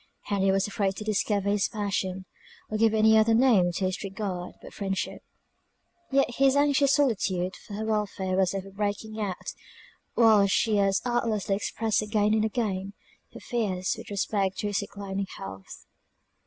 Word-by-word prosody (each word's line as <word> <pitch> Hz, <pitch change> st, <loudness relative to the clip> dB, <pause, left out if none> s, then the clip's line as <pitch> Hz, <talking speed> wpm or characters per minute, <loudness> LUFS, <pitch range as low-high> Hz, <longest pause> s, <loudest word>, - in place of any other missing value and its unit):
Henry 195 Hz, -1 st, 0 dB
was 195 Hz, +1 st, +2 dB
afraid 195 Hz, -2 st, -1 dB
to 215 Hz, -, -6 dB
discover 205 Hz, -1 st, 0 dB
his 205 Hz, -1 st, +2 dB
passion, 190 Hz, -3 st, -2 dB, 0.5 s
or 215 Hz, -, 0 dB
give 225 Hz, -1 st, +4 dB
any 220 Hz, 0 st, +5 dB
other 220 Hz, +1 st, +5 dB
name 225 Hz, -8 st, +4 dB
to 185 Hz, -, -1 dB
his 185 Hz, +2 st, -2 dB
regard 195 Hz, -3 st, -5 dB
but -, -, -12 dB
friendship; 195 Hz, -2 st, -3 dB, 0.9 s
yet 275 Hz, 0 st, +3 dB
his 270 Hz, 0 st, +4 dB
anxious 285 Hz, -1 st, +4 dB
solicitude 190 Hz, -9 st, 0 dB
for 205 Hz, -, -10 dB
her 215 Hz, +1 st, -3 dB
welfare 205 Hz, -3 st, -1 dB
was 190 Hz, 0 st, +2 dB
ever 195 Hz, 0 st, -5 dB
breaking 205 Hz, +2 st, -3 dB
out 190 Hz, -3 st, -4 dB, 0.6 s
while 220 Hz, -4 st, +5 dB
she 210 Hz, +2 st, +2 dB
as 195 Hz, 0 st, +2 dB
artlessly 225 Hz, -5 st, 0 dB
expressed 220 Hz, +2 st, -1 dB
again 210 Hz, 0 st, +1 dB
and 220 Hz, 0 st, +2 dB
again, 200 Hz, -4 st, -2 dB, 0.4 s
her -, -, -10 dB
fears 195 Hz, -7 st, -1 dB
with -, -, -10 dB
respect 200 Hz, -1 st, -1 dB
to -, -, -3 dB
his 205 Hz, -1 st, 0 dB
declining 200 Hz, -1 st, -5 dB
health. 95 Hz, 0 st, -9 dB
205 Hz, 160 wpm, -27 LUFS, 195-220 Hz, 0.9 s, any